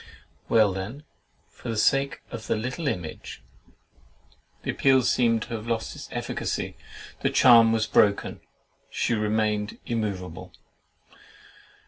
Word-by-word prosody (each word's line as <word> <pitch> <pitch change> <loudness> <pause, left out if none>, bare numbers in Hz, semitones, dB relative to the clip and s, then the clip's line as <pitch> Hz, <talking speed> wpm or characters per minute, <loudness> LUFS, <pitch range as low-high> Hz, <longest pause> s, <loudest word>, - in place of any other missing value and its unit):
Well, 110 -4 +4
then, 105 +10 -6 0.5
for 120 - -9
the 115 - -2
sake 135 +6 +2
of 115 -2 -7
THE - - +1
LITTLE 125 +8 -3
IMAGE!" 90 - -5 1.2
The - - -1
appeal 135 -1 +3
seemed 115 -2 +2
to 120 - -8
have 110 0 -5
lost 115 -1 -2
its - - -9
efficacy; - - -3 0.5
the - - +2
charm 115 -3 +6
was 110 -1 +1
broken; 100 -1 +2 0.5
she - - -1
remained 105 -1 0
immoveable. 100 -7 -4
110 Hz, 120 wpm, -26 LUFS, 105-120 Hz, 1.2 s, charm